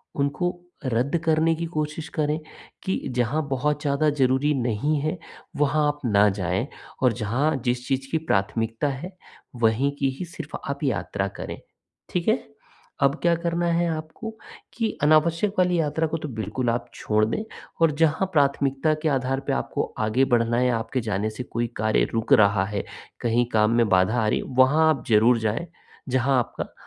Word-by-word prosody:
उनको 175 +6 -1 0.3
रद्द 130 +5 +1
करने 160 +1 +3
की 170 +1 -3
कोशिश 155 +1 -3
करें, 150 0 -1 0.4
कि 190 - 0 0.2
जहाँ 125 +6 +1
बहुत 145 +3 0
ज़्यादा 145 +1 +2
ज़रूरी 140 +1 +2
नहीं 125 +4 0
है, 155 +4 -1 0.4
वहाँ 150 +1 +2
आप 145 0 -1
ना 105 -2 +4
जाएँ 95 +6 -1 0.4
और 125 -2 +4
जहाँ 125 +8 0
जिस 125 0 -1
चीज़ 135 -1 -1
की 160 - +2
प्राथमिकता 115 -2 0
है, 140 +7 -5 0.4
वहीं 120 +4 +2
की 135 - +2
ही 180 - -3
सिर्फ़ 160 -3 -8
आप 140 +1 -4
यात्रा 105 -6 -1
करें। - - -5 0.5
ठीक 175 -1 -2
है? 220 +3 +4 0.6
अब 140 0 +4
क्या 170 -1 +3
करना 170 +1 -1
है 170 +1 +2
आपको, 160 +8 -5 0.4
कि 225 -2 -1
अनावश्यक 165 +6 +3
वाली 180 -1 +3
यात्रा 160 +1 0
को 160 +1 -2
तो 155 - -5
बिल्कुल 120 +3 -1
आप 120 +1 -2
छोड़ 110 0 +1
दें 115 - -2 0.4
और 165 -2 +5
जहाँ 160 +4 +3
प्राथमिकता 140 0 +2
के 160 - +2
आधार 135 -1 0
पे - - +1
आपको 65 - -2
आगे 110 +5 +2
बढ़ना 115 0 +1
है, 125 +1 +3
आपके 120 +2 -1
जाने 105 -1 -1
से 110 +3 -6
कोई 120 -1 -2
कार्य 110 0 +2
रुक 115 +4 +1
रहा 100 -5 +5
है, 105 0 -3 0.4
कहीं 120 +1 +2
काम 105 0 +4
में 115 -1 +4
बाधा 95 +6 +3
आ - - +1
रही - - +1
है, - - -5
वहाँ 150 +5 +5
आप 145 -6 0
ज़रूर 115 +2 +5
जाएँ, 110 +9 -1 0.4
जहाँ 130 +1 +2
आपका 120 - -4
135 Hz, 175 wpm, -24 LUFS, 115-155 Hz, 0.6 s, और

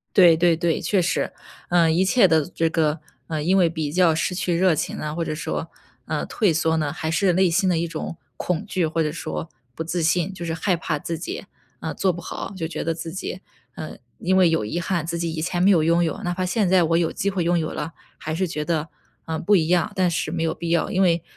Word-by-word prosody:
对 175 -4 +8
对 170 0 +4
对， 170 0 0
确 195 -3 +2
实。 175 - 0 0.4
嗯， 170 -2 +4
一 175 +3 +3
切 200 +2 +5
的 160 -3 +3
这 165 -2 -1
个， 155 -1 +1 0.3
呃， 155 -2 -2
因 185 +4 +3
为 175 -3 +4
比 160 -3 -3
较 175 0 +4
失 170 - 0
去 180 -1 -1
热 185 0 +4
情 155 - -3
啊， 150 0 -4
或 165 +1 -2
者 155 - -3
说， 155 - -4 0.4
嗯， - - -2
退 210 -6 +2
缩 160 +1 +1
呢， 150 -2 0
还 160 0 -3
是 180 +3 +2
内 185 +1 +4
心 185 +3 +2
的 175 - +2
一 170 +1 0
种 165 0 -5 0.2
恐 180 -3 -2
惧， 185 -4 0
或 165 +1 0
者 150 - -1
说 80 - -5 0.3
不 160 - -3
自 170 +2 -2
信 175 +3 +1
就 175 -2 -7
是 165 - -2
害 180 +3 +1
怕 160 -2 -2
自 165 +3 -4
己， 180 - -5 0.4
嗯， 160 - -4
做 190 - +2
不 175 0 -7
好， 195 - -6
就 165 -3 -2
觉 165 - -4
得 165 - 0
自 165 0 -6
己 185 +1 -5 0.4
嗯， 155 - -7 0.2
因 185 +2 +1
为 185 -2 +5
有 165 -9 +1
遗 165 +11 -2
憾 170 -2 -1
自 170 +1 -3
己 170 -1 -1
以 160 -1 -3
前 175 +2 -1
没 190 - +5
有 165 -5 +4
拥 170 +2 +3
有， 165 - -1
哪 175 - -1
怕 185 +1 -2
现 195 +2 +1
在 185 -1 +4
我 165 0 +2
有 170 -1 +1
机 200 - -1
会 190 -3 -1
拥 175 +1 +2
有 155 - -2
了， 150 +2 -4 0.3
还 155 - -4
是 185 +3 0
觉 155 -3 -3
得， 160 -1 -1 0.4
嗯， 160 0 -3
不 205 +4 +4
一 160 -4 +3
样， 175 -1 +2
但 185 -2 +2
是 160 -2 -2
没 165 0 -2
有 160 -1 0
必 170 - -5
要。 170 -1 +2
因 190 - +2
为 170 -2 +2
170 Hz, 280 characters per minute, -23 LUFS, 160-180 Hz, 0.4 s, 对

